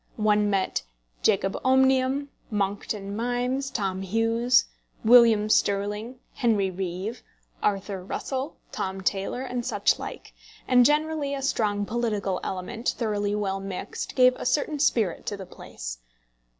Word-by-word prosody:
One 210 -1 +3
met 195 -2 0 0.4
Jacob 195 0 +2
Omnium, 265 +1 +3 0.2
Monckton 200 0 -2
Milnes, 245 +4 -1
Tom 195 -6 -2
Hughes, 225 +5 +2 0.4
William 230 -3 +7
Stirling, 210 +4 0 0.2
Henry 210 -6 +1
Reeve, 190 +5 -4 0.4
Arthur 195 -2 -1
Russell, 265 - -4 0.2
Tom 190 0 -3
Taylor, 195 +6 -1
and 250 -2 -3
such - - +1
like; - - -8 0.3
and 250 -1 +6
generally 300 -1 0
a 270 - -5
strong 205 -6 0
political 210 -5 -1
element, 190 +6 -3
thoroughly 205 -3 -1
well 195 -2 -1
mixed, 195 -1 -5
gave 255 -1 +6
a - - -6
certain 295 +1 0
spirit 225 - +1
to 205 - -2
the 190 - -7
place. - - -8
215 Hz, 125 wpm, -26 LUFS, 195-250 Hz, 0.4 s, William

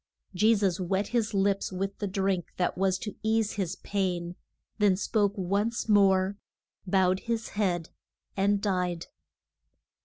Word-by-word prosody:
Je 215 +5 +4
sus 195 -3 0
wet 190 +2 -1
his 230 -3 0
lips 195 0 +1
with 195 +1 -3
the 205 - -2
drink 190 -2 -1
that 180 - 0
was 190 0 +1
to 210 +1 -6
ease 220 -1 +1
his 190 -5 -2
pain, 180 -3 -2 0.4
then 200 -3 +4
spoke 205 0 0
once 200 +6 -1
more, 195 -2 +4 0.5
bowed 185 0 +3
his 230 0 -3
head 180 -5 -1 0.5
and 200 +1 +1
died. 180 -4 -1
195 Hz, 135 wpm, -28 LUFS, 185-205 Hz, 0.5 s, Je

